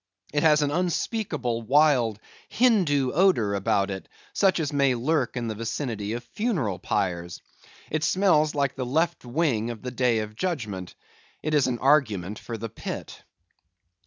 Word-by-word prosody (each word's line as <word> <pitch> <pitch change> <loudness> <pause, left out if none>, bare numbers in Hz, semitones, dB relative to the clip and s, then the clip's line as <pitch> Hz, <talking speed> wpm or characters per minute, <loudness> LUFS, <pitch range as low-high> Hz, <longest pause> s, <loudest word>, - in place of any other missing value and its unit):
It 145 - +2
has 150 -1 +5
an 145 - 0
unspeakable, 165 - -1
wild, 125 -4 +3 0.3
Hindoo 175 - +3
odor 155 - +3
about 100 0 +1
it, 95 -1 -7 0.2
such 190 -3 +3
as 150 -2 -2
may 140 -3 +3
lurk 130 0 0
in 120 -1 -2
the 110 - -2
vicinity 110 -1 -3
of 120 +1 -4
funereal 150 - -2
pyres. 85 -4 -2 0.5
It 155 -1 -1
smells 155 -4 +3
like 140 -1 +1
the 130 - -3
left 160 +7 0
wing 120 -4 0
of 115 -3 -7
the 125 - -4
day 125 -2 +1
of 105 0 -7
judgment; 110 - -4 0.5
it 155 - -1
is 145 -3 +3
an 125 -2 -1
argument 110 - +2
for 115 - -6
the 115 - -5
pit. 115 - -7
130 Hz, 160 wpm, -26 LUFS, 110-155 Hz, 0.5 s, has